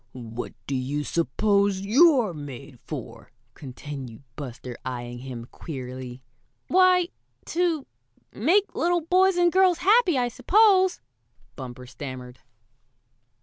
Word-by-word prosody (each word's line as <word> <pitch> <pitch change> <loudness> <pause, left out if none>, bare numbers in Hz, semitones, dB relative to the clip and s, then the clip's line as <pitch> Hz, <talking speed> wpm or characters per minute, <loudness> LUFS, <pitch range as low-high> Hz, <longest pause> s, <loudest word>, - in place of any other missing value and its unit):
"What 120 -1 -7
do 140 - -4
you 135 +3 -2
suppose 200 - +1
you're 245 - +4
made 140 -3 -9
for?" 120 -6 -8 0.2
continued 135 -3 -9
Buster, 125 -3 -7
eyeing 120 -1 -5
him 125 -2 -7
queerly. 130 -2 -8 0.5
"Why 365 -1 +4 0.4
to 335 -4 0 0.5
make 400 +3 +2
little 345 +1 +1
boys 365 +3 +3
and 350 -1 +4
girls 370 -1 +4
happy, 380 - +4
I 245 -1 +1
suppose," 375 - +4 0.5
Bumper 125 -1 -8
stammered. 130 -1 -8
155 Hz, 105 wpm, -25 LUFS, -, 0.5 s, you're